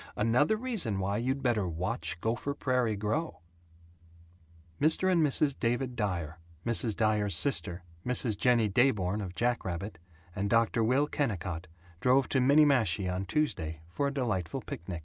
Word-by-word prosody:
Another 125 - +2
reason 215 - -2
why 95 +2 -1
you'd 130 +4 -2
better 115 -7 +1
Watch 85 -1 -3
Gopher 120 +5 -2
Prairie 125 -6 0
Grow. 110 - -3 1.4
Mr. 160 +5 +3
and 175 -2 +3
Mrs. 145 0 +2
David 120 +1 -1
Dyer, 85 -7 -3 0.3
Mrs. 115 -2 +2
Dyer's 105 -4 +1
sister, 90 -4 0 0.2
Mrs. 125 -3 +1
Jennie 120 0 +3
Dayborn 105 -3 +1
of 90 -2 -6
Jackrabbit, 100 -5 -2 0.4
and 100 +1 -1
Dr. 115 +1 +2
Will 130 +6 +3
Kennicott 90 - -3 0.3
drove 130 +4 +3
to 135 - +2
Minniemashie 125 - +3
on 95 +1 -3
Tuesday 80 - -2
for 140 +9 -1
a - - -1
delightful 110 - -2
picnic. 85 0 -6
115 Hz, 140 wpm, -30 LUFS, 95-135 Hz, 1.4 s, Mr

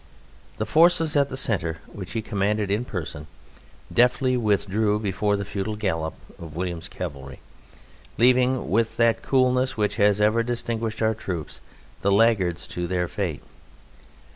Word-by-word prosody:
The - - -1
forces 165 -1 +4
at 140 -1 +3
the 130 - -4
centre, 85 -10 0
which 95 -3 -9
he 115 -1 -2
commanded 105 -1 -1
in 110 +5 0
person, 80 - -6 0.7
deftly 125 +1 +3
withdrew 105 -2 +1
before 105 0 0
the 100 - -4
futile 100 +1 -3
gallop 80 -7 -2 0.2
of 80 -2 -9
William's 85 -1 -4
cavalry, 70 -7 -7 0.8
leaving, 125 +1 +3
with 115 +2 +1
that 115 -1 +3
coolness 130 -1 +2
which 105 0 0
has 105 -1 +3
ever 110 +2 +3
distinguished 115 -2 -3
our 110 0 +3
troops, 90 -7 -6 0.4
the 100 - +2
laggards 100 -5 +3
to 90 0 -3
their 90 0 -1
fate. 90 -6 -4
105 Hz, 140 wpm, -24 LUFS, 95-115 Hz, 0.8 s, forces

